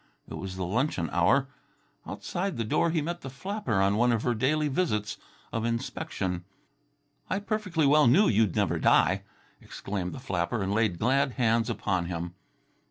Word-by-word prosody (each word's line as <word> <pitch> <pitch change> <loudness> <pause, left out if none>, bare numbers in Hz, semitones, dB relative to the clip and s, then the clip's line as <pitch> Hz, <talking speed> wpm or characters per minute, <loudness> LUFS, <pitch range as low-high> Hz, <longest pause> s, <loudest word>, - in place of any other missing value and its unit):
It - - -9
was 95 -1 -6
the 95 -1 -3
luncheon 100 - -1
hour. 95 +11 +3 0.6
Outside 190 -1 -3
the 115 - 0
door 140 +9 +1
he 160 -2 0
met 170 +2 -4
the 135 - -6
flapper 190 - -3
on 100 +1 +3
one 120 +2 +3
of 115 -1 0
her 125 - +1
daily 150 +6 +1
visits 130 - -1 0.4
of 115 - -1
inspection. 115 - -3 0.9
"I 190 - 0
perfectly 200 -6 -1
well 150 0 +5
knew 185 - +5
you'd 105 -4 +2
never - - +1
die," - - +4 0.4
exclaimed 95 -3 -5
the - - -7
flapper, 95 -3 -2
and 95 +1 -1
laid 105 -5 +1
glad 130 +5 +2
hands 115 -2 +1
upon 95 -4 -1
him. 85 0 -4
115 Hz, 165 wpm, -28 LUFS, 95-150 Hz, 0.9 s, well